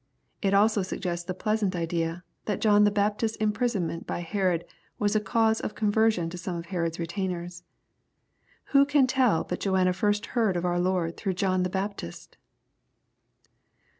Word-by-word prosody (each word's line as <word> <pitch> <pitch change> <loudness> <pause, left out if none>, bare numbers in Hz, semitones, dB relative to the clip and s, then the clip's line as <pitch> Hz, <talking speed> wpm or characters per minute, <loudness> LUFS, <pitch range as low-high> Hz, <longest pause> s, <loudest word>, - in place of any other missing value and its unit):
It. 195 -3 +2
also 210 +1 +4
suggests 175 -2 -4
ikiQ 185 - -3
pleasant 215 -3 0
idea, 165 0 -2 0.2
that 205 -3 -1
John 210 -1 +5
the - - +5
Baptist's 210 +2 0
imprisonment 210 -6 -1
by - - -3
Herod 180 -2 0 0.3
was 210 0 0
a - - +5
cause 220 +2 +2
of - - -5
conversion 215 -4 +2
to 180 - -7
some 175 +1 -4
of 170 0 -5
Herod's 170 -2 -2
retainers. 175 0 -4 1.1
Who 275 0 +7
can 285 -1 +4
tell 255 -9 +2
but 180 - -4
Joanna 185 -2 +2
first 210 +2 0
heard 220 -7 +2
of 175 - -2
our 175 0 +1
Lord 180 -2 0
through 195 -3 -2
John 185 0 +1
the 180 - 0
Baptist 190 - -5
195 Hz, 160 wpm, -27 LUFS, 175-215 Hz, 1.1 s, Who